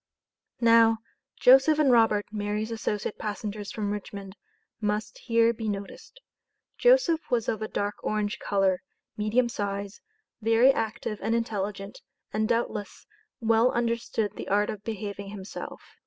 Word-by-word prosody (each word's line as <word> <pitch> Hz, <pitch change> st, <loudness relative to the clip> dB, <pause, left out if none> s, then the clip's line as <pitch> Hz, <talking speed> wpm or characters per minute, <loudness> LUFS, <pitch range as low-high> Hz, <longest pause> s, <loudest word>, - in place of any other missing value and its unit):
Now, 230 Hz, -1 st, +6 dB, 0.4 s
Joseph 270 Hz, +4 st, +6 dB
and 295 Hz, -4 st, +4 dB
Robert 225 Hz, -3 st, +4 dB
(Mary's 210 Hz, +1 st, -2 dB
associate 215 Hz, -2 st, -3 dB
passengers 210 Hz, -1 st, -4 dB
from 205 Hz, -2 st, -2 dB
Richmond) 200 Hz, -1 st, -6 dB, 0.4 s
must 210 Hz, 0 st, -2 dB
here 230 Hz, -1 st, +3 dB
be 220 Hz, -1 st, -4 dB
noticed. 200 Hz, -, -7 dB, 0.6 s
Joseph -, -, +4 dB
was 235 Hz, -3 st, +1 dB
of 220 Hz, -, -1 dB
a 215 Hz, -, -2 dB
dark 205 Hz, 0 st, -2 dB
orange 210 Hz, -1 st, -1 dB
color, 195 Hz, -2 st, +1 dB, 0.3 s
medium 215 Hz, +4 st, +1 dB
size, 200 Hz, -2 st, -4 dB, 0.4 s
very 225 Hz, +4 st, +5 dB
active 220 Hz, -2 st, -3 dB
and 225 Hz, -, 0 dB
intelligent, 205 Hz, -3 st, -3 dB, 0.3 s
and 215 Hz, +1 st, 0 dB
doubtless, 220 Hz, -3 st, -2 dB, 0.4 s
well 225 Hz, +2 st, +4 dB
understood 230 Hz, -3 st, -1 dB
the -, -, -7 dB
art 205 Hz, +1 st, +2 dB
of 210 Hz, -1 st, -9 dB
behaving 200 Hz, -2 st, -5 dB
himself. 200 Hz, -1 st, -8 dB
215 Hz, 130 wpm, -27 LUFS, 205-230 Hz, 0.6 s, Now